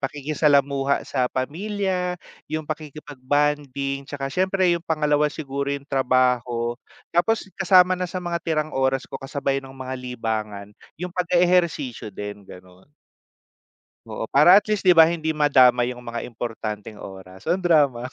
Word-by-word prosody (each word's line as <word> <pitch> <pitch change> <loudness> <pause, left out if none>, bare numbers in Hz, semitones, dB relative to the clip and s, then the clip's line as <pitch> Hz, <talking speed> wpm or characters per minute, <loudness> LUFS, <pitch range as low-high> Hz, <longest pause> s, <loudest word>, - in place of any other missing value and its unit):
pakikisalamuha 140 -1 +1
sa 130 -2 0
pamilya, 180 +5 -2 0.3
yung 155 0 -3
pakikipag-bonding, 145 -2 -2
tsaka 140 -1 -4
siyempre, 185 -1 +2
yung 170 - -4
pangalawa 150 -3 +1
siguro, 140 -2 -4
yung 140 0 -4
trabaho. 125 -3 +1 0.4
Tapos 215 +6 +2
kasama 185 -1 +5
na 180 0 -2
sa 185 - -3
mga 170 -1 -2
tirang 155 -1 -1
oras 135 0 0
ko, - - -12
kasabay 135 0 -2
no'ng 135 0 -12
mga 130 0 -5
libangan, 110 -5 -4 0.3
yung 180 0 -6
pag-e-ehersisyo 175 - +1
din, 105 +1 -7
gano'n. 90 +7 -15 1.2
Oo, - - -5
para, 165 +7 +7
at 205 - +4
least, 210 -2 -1
'di 180 - +7
ba, 160 - +10
hindi 165 -1 -2
madamay 125 -4 +4
yung 125 - -11
mga 120 -1 -6
importanteng 110 -2 -6
oras. 95 -1 -11
O, - - +1
ang 185 - -1
drama, 145 -8 +2
140 Hz, 140 wpm, -23 LUFS, 125-165 Hz, 1.2 s, ba